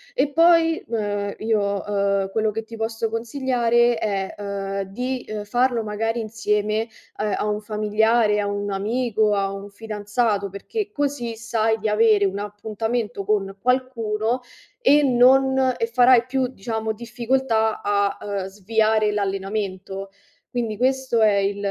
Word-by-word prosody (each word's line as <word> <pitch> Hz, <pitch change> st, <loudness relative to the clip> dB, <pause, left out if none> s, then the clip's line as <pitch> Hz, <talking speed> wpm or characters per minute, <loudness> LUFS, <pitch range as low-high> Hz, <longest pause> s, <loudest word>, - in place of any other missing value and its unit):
e 295 Hz, -, +1 dB
poi, 330 Hz, 0 st, +4 dB
ehm, 205 Hz, -3 st, -2 dB
io, 205 Hz, -3 st, 0 dB
uhm, 200 Hz, -1 st, 0 dB
quello 220 Hz, 0 st, +1 dB
che 225 Hz, +2 st, -4 dB
ti 230 Hz, +1 st, -10 dB
posso 225 Hz, 0 st, -2 dB
consigliare 240 Hz, 0 st, +1 dB
è, 195 Hz, -3 st, -2 dB
uhm, 200 Hz, -1 st, -4 dB
di, 250 Hz, +4 st, -3 dB
uhm, 215 Hz, -1 st, -4 dB
farlo 240 Hz, +2 st, +1 dB
magari 225 Hz, +2 st, -2 dB
insieme, 215 Hz, 0 st, -1 dB, 0.3 s
ehm, 210 Hz, -1 st, 0 dB
a -, -, -1 dB
un 210 Hz, 0 st, -1 dB
familiare, 215 Hz, +1 st, +2 dB
a 205 Hz, -, -1 dB
un 205 Hz, 0 st, -3 dB
amico, 215 Hz, +1 st, 0 dB
a 195 Hz, -1 st, 0 dB
un 195 Hz, +1 st, -8 dB
fidanzato, 210 Hz, 0 st, -2 dB
perché 415 Hz, -, -5 dB
così 285 Hz, -, -2 dB
sai 225 Hz, 0 st, 0 dB
di 220 Hz, 0 st, -3 dB
avere 210 Hz, -1 st, +4 dB
un 195 Hz, +1 st, -1 dB
appuntamento 210 Hz, +1 st, -3 dB
con 195 Hz, -2 st, 0 dB
qualcuno 245 Hz, -2 st, 0 dB, 0.4 s
e 295 Hz, -10 st, +5 dB
non 265 Hz, 0 st, +4 dB
e 460 Hz, -, +1 dB
farai 250 Hz, -, +5 dB
più, 260 Hz, 0 st, 0 dB
diciamo 220 Hz, -2 st, -3 dB
difficoltà, 235 Hz, -1 st, 0 dB
a, 200 Hz, -1 st, +1 dB
uhm, 200 Hz, -2 st, -3 dB
sviare 215 Hz, +2 st, +1 dB
l'allenamento. 195 Hz, -1 st, -3 dB, 0.4 s
Quindi 230 Hz, -4 st, -3 dB
questo 260 Hz, -1 st, +1 dB
è 215 Hz, -2 st, +5 dB
il 200 Hz, 0 st, 0 dB
220 Hz, 140 wpm, -23 LUFS, 205-240 Hz, 0.4 s, e